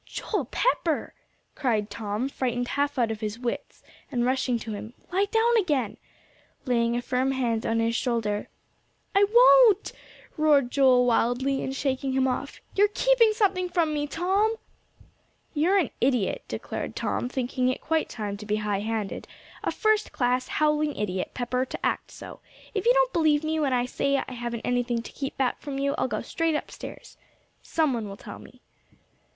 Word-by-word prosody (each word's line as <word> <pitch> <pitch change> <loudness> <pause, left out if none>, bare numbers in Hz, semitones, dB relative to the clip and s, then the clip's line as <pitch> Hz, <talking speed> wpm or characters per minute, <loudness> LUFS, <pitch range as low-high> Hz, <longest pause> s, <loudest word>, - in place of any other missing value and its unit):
"Joel 400 - -3
Pepper!" 330 - 0 0.4
cried 225 -7 -1
Tom, 215 +3 -2
frightened 245 -3 -2
half 285 0 -1
out 235 -3 +2
of 220 - -4
his 215 0 -4
wits, 240 -1 -5 0.3
and 240 -1 0
rushing 255 -1 +1
to 225 -1 -6
him; 220 +4 -7 0.2
"lie 390 +2 +3
down 460 +2 +3
again," 290 - 0 0.7
laying 235 -2 +1
a 245 - -2
firm 260 +2 0
hand 235 -4 -1
on 225 0 +1
his 230 0 +1
shoulder. 225 -4 -1 0.6
"I 395 +1 +5
won't," 475 -3 +6 0.5
roared 290 -5 +4
Joel 260 -3 +5
wildly, 245 +3 +1
and 265 - -3
shaking 270 -1 -1
him 265 0 +2
off. 255 - -3
"You're 410 +1 +4
keeping 465 +1 +4
something 385 -4 +1
from 335 -3 +1
me, 295 0 -1
Tom." 390 +8 +1 1.0
"You're 345 +6 +3
an 340 -10 +1
idiot," 255 - +1
declared - - -5
Tom, 245 - -2
thinking 255 0 -1
it 255 - -2
quite 320 0 0
time 205 -3 -4
to 210 - -9
be 210 - +1
high 210 -2 -1
handed, 215 -1 -3 0.4
"a - - 0
first 435 -1 +1
class, 250 0 0
howling 300 -1 +1
idiot, 190 -3 -2
Pepper, 250 +1 -1
to - - -5
act - - -1
so. - - -10 0.3
If 420 +2 -1
you - - +7
don't - - +3
believe 310 -2 +3
me, 315 0 0
when 285 -3 +1
I 245 -1 +2
say 275 +2 0
I 265 - -4
haven't 240 -2 -4
anything 245 -1 0
to - - -9
keep 275 -1 -5
back 260 -2 0
from 280 -2 -5
you, 280 +1 0
I'll - - +1
go - - -3
straight 330 -1 0
upstairs. - - -7 0.4
Some 310 -4 +1
one 225 -4 -3
will 195 - -8
tell - - -9
me." - - -16
265 Hz, 175 wpm, -26 LUFS, 235-315 Hz, 1.0 s, you